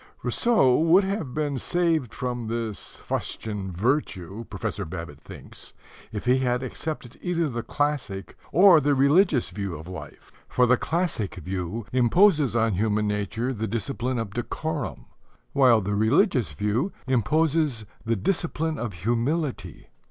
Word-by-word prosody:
"'" - - -34
Rousseau 220 - +3
would 165 +5 +5
have 190 - -3
been 145 -3 -1
saved 165 -5 0
from 120 -3 -4
this 115 -2 -4
fustian 105 -4 -3
virtue, 105 - -1
Professor - - -3
Babbitt 80 -2 -7
thinks, - - -11 0.4
if 105 +1 -5
he 125 +1 +4
had 125 0 0
accepted 130 -2 -5
either 170 -2 0
the 120 -4 -3
classic 135 -10 -2 0.2
or 180 -1 +7
the 145 0 +2
religious 140 - +3
view 100 -4 -4
of 80 +2 -10
life: 80 -6 -10 0.2
for 125 - +3
the 125 +1 +5
classic 160 - -2
view 90 +4 -4
imposes 145 - +4
on 115 -2 +2
human 105 +2 +1
nature 105 +5 -2
the 110 -1 -3
discipline 120 +3 -2
of 110 -4 -4
decorum, 145 +4 -4 0.5
while 125 -5 +5
the 100 +1 -2
religious 115 - +2
view 105 - 0
imposes 135 0 +1 0.2
the 115 0 0
discipline 160 - -1
of 115 -4 -3
humility. 120 - -2
125 Hz, 140 wpm, -25 LUFS, 105-150 Hz, 0.5 s, or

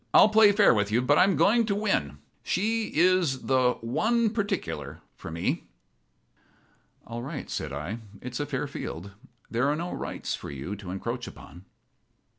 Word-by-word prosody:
I'll - - +8
play 215 -1 +7
fair 205 - +5
with 105 -2 0
you, 120 +3 +2
but 145 +3 +4
I'm 195 0 +5
going 230 +4 +4
in - - +1
to 200 - +1
win. 190 - 0 0.2
She 220 +4 0
is 170 -5 +3
the 130 -2 +3
'one 220 - +1
particular' 80 - -3 0.2
for - - -9
me." 85 +1 -2 1.4
"All 115 +1 -6
right," 140 +3 -6
said 75 - -3
I. 75 +11 -4 0.2
"It's 125 -1 -6
a 145 - -2
fair 145 0 -2
field. 100 - -6 0.4
There 125 +4 +1
are 145 - +2
no 170 +3 -4
rights - - -4
for - - -6
you 70 +9 -5
to 95 -2 -9
encroach 115 +6 -4
upon." 90 +2 -12
130 Hz, 170 wpm, -27 LUFS, -, 1.4 s, I'll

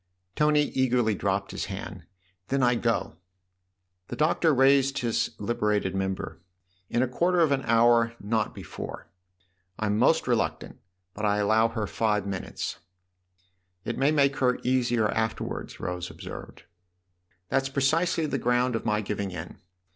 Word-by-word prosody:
Tony 150 0 +3
eagerly 125 -5 +1
dropped 100 0 -1
his - - -3
hand. 95 -3 -7 0.4
"Then 135 -1 +1
I 125 0 +4
go!" 115 -8 -1 0.4
" 90 -1 -51
The - - -5
Doctor 160 +1 +2
raised 135 0 +4
his 115 -2 0
liberated 105 -3 0
member. 95 0 -3 0.3
" 90 +1 -41
In 120 - +1
a - - 0
quarter 175 +8 +1
of 160 -4 +4
an 135 -1 +2
hour 115 0 +4
not 105 +1 -1
before. - - -7 0.7
I'm 105 -1 0
most 160 +5 +3
reluctant, 80 -10 -1 0.3
but 105 - -7
I 105 -1 +2
allow 110 +2 +3
her 110 -2 -3
five 105 0 0
minutes." 95 -2 -4 0.5
" 90 0 -43
It - - -2
may 135 +2 +4
make 140 -2 +2
her 125 -1 +2
easier 120 -3 +2
afterwards," 110 +1 -3
Rose 90 0 -4
observed. - - -9 0.9
"That's 135 0 +1
precisely 160 +5 +1
the 140 -3 -2
ground 125 +1 +1
of 115 - -3
my 105 -1 +1
giving 100 -1 -3
in. 90 -2 -8
115 Hz, 150 wpm, -27 LUFS, 100-130 Hz, 0.9 s, I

